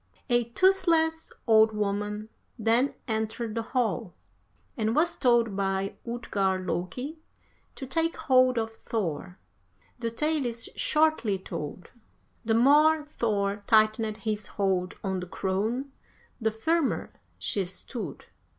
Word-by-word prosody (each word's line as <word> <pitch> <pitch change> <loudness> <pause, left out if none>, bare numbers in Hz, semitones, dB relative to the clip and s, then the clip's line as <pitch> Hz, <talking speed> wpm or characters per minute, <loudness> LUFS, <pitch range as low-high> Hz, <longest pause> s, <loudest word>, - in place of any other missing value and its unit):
53. 240 - +3
"A - - -30
toothless 335 -4 +3
old 220 -1 +5
woman 210 +1 -2 0.3
then 235 +4 +2
entered 220 0 -2
the 230 - -1
hall, 225 -5 -1 0.6
and 220 0 0
was 335 +3 +3
told 235 -5 +3
by 195 0 -1 0.2
Utgard 195 -5 -1
Loki 250 - -3 0.6
to 270 - -6
take 325 +5 0
hold 255 -1 +4
of 225 0 -2
Thor. 180 -4 -3 0.6
The 230 -1 -1
tale 300 +3 0
is 230 -1 -4
shortly 305 -10 +2
told. 170 -2 -7 0.5
The 225 0 +1
more 300 +5 +5
Thor 205 -2 0
tightened 215 0 +3
his 215 -1 -3
hold 190 -2 0
on 190 -2 -1
the 180 - -6
crone 215 +10 -2 0.5
the 220 -2 +1
firmer 310 +8 0 0.2
she 200 - 0
stood. 190 +6 -7
225 Hz, 125 wpm, -28 LUFS, 200-260 Hz, 0.6 s, old